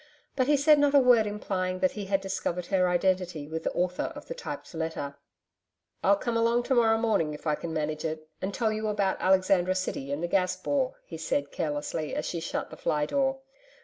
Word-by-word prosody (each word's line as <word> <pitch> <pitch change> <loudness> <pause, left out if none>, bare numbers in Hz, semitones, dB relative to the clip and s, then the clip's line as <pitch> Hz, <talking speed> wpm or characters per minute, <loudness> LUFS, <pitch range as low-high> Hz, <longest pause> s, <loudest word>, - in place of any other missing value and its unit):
But 260 -1 +1
he 295 0 +4
said 295 +1 +5
not 290 0 +3
a - - +9
word 245 -4 +5
implying 185 -3 -2
that 275 +9 +2
he 205 -2 -6
had 195 0 +1
discovered 180 -2 -3
her 185 -1 +2
identity 180 -4 0
with 160 +1 -4
the - - -1
author 180 0 -1
of - - -9
the - - -5
typed - - -7
letter. 160 -3 -4 0.9
'I'll 200 - +5
come 235 +3 -3
along 230 +1 +2
to 265 - 0
morrow 225 -2 +4
morning 205 -10 +1
if 150 - -13
I 155 - +2
can 165 +2 -4
manage 155 -1 -2
it, 155 -1 -4
and 190 - -2
tell 220 0 0
you 215 0 -2
about 205 -2 0
Alexandra 185 -1 +3
City 140 -7 -3
and 145 +4 -2
the - - +1
Gas 185 0 +1
Bore,' 260 +7 -1
he 165 - -8
said 145 -3 -1
carelessly 150 0 -3
as - - -2
she 170 - -3
shut 165 - -4
the - - -9
fly 150 -1 0
door. 270 - 0
185 Hz, 215 wpm, -28 LUFS, 160-230 Hz, 0.9 s, a